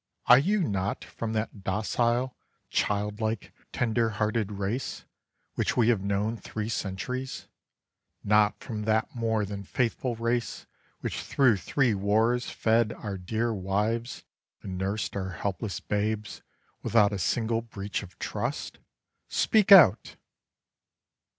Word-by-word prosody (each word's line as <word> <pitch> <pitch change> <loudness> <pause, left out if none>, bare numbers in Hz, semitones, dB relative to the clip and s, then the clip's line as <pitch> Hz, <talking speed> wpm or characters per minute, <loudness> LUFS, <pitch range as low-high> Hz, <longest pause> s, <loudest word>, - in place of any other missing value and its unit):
Are 125 - +8
you 195 +6 +1
not 95 -1 -2
from 115 -1 -5
That 110 -2 -3
docile, 120 +6 0 0.4
child 105 +1 0
like, 110 -1 -2 0.2
tender 115 -1 +1
hearted 105 0 -1
race 100 +6 -3 0.5
Which - - -1
we 120 -1 +4
have 115 -5 +2
known 100 +3 -1
three 110 0 -5
centuries? 120 +6 -4 0.8
Not 105 0 +3
from 105 -3 -5
That 110 0 +1
more 110 -3 0
than 100 0 -6
faithful 120 +3 -1
race 115 +1 -2 0.4
which - - -3
through 125 -7 +3
three 125 +4 +1
wars 110 +5 +1
Fed 115 0 +2
our 100 -3 -5
dear 110 +6 -1
wives 105 +5 -2 0.4
and 95 - -5
nursed 100 +4 -2
our 95 -2 -3
helpless 100 +2 -3
babes 105 0 -2 0.4
Without 105 -3 +3
a 100 - -2
single 115 +5 0
breach 105 -3 -5
of 95 -3 -12
trust? - - -4 0.5
Speak 210 -3 +2
out! 145 - +8
110 Hz, 125 wpm, -28 LUFS, 100-115 Hz, 0.8 s, Are